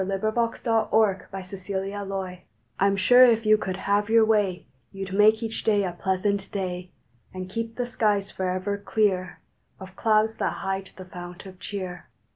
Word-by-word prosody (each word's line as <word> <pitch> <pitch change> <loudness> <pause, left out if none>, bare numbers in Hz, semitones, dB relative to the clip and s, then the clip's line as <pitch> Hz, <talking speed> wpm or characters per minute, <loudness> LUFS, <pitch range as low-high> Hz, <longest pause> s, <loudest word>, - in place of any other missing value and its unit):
December 195 +3 -1
Tenth 230 0 -1
THE 225 -2 +2
WEATHER 210 -4 +2 0.8
MAKER 190 -2 -4 0.4
I 195 - +4
M 200 - +2
sure 245 +7 +7
if 230 -2 +4
you 215 0 +6
could 190 -3 -3
have 205 +2 0
your 225 0 +5
way 205 -5 +1 0.3
You 195 -1 -5
d 190 0 -6
make 215 +2 +5
each 225 0 -4
day 205 -2 +3
a 185 - -1
pleasant 190 +2 -1
day, 180 -2 -4 0.4
And 185 0 -5
keep 230 +3 -4
the 245 - -1
skies 215 -5 0
forever 185 +2 -2
clear 200 -3 0 0.4
Of 190 -1 -11
clouds 220 0 +2
that - - 0
hide 195 0 -4
the 185 - -9
fount 180 0 -9
of 185 -1 -12
cheer. 185 -3 -6
200 Hz, 175 wpm, -25 LUFS, 185-220 Hz, 0.8 s, sure